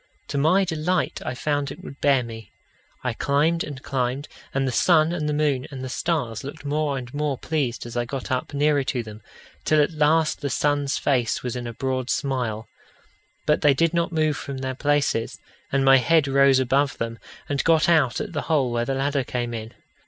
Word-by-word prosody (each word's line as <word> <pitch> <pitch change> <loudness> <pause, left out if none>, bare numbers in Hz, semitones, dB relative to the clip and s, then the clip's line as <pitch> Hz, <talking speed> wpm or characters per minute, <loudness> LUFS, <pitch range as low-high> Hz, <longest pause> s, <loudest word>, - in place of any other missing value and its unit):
To - - -2
my 180 +7 +4
delight 170 +1 -1
I 125 - -3
found 145 +1 -1
it - - -10
would 140 - -10
bear 140 -3 +4
me. 115 -2 -9 0.5
I 125 -2 -1
climbed 150 +7 +1
and 135 -3 -8
climbed, 135 0 -2 0.2
and 135 0 0
the - - 0
sun 160 +5 +4
and 150 -3 -2
the - - +1
moon 145 -2 0
and 135 -3 -7
the 130 - -4
stars 145 -7 -2
looked 145 +2 -8
more 145 -1 0
and 125 0 -7
more 145 -2 -1
pleased 135 -8 -2
as 120 0 -8
I 120 0 0
got 130 +1 -5
up 130 - -1
nearer 145 0 +2
to 130 -2 -2
them, 110 -1 -10 0.4
till 155 - +3
at 145 +3 +3
last 155 0 +2
the 140 - -2
sun's 145 0 +1
face 125 -5 0
was 125 -1 -3
in 120 -1 -4
a 120 - -5
broad 130 0 -2
smile. 120 -5 -1 0.8
But 150 - +2
they 145 -2 +5
did 165 +4 +2
not 170 0 0
move 155 -3 +1
from 140 0 -6
their 130 0 -3
places, 145 -4 0 0.3
and 135 0 +2
my 135 0 +8
head 145 +4 +3
rose 135 0 +5
above 135 +2 +1
them, 115 0 -4 0.3
and 140 -1 -1
got 165 -1 +4
out 155 -9 +3
at - - -5
the 150 - -1
hole 140 -6 +2
where 120 0 0
the 135 - -1
ladder 140 0 0
came 120 -1 -3
in. 110 0 -6
140 Hz, 210 wpm, -24 LUFS, 125-150 Hz, 0.8 s, my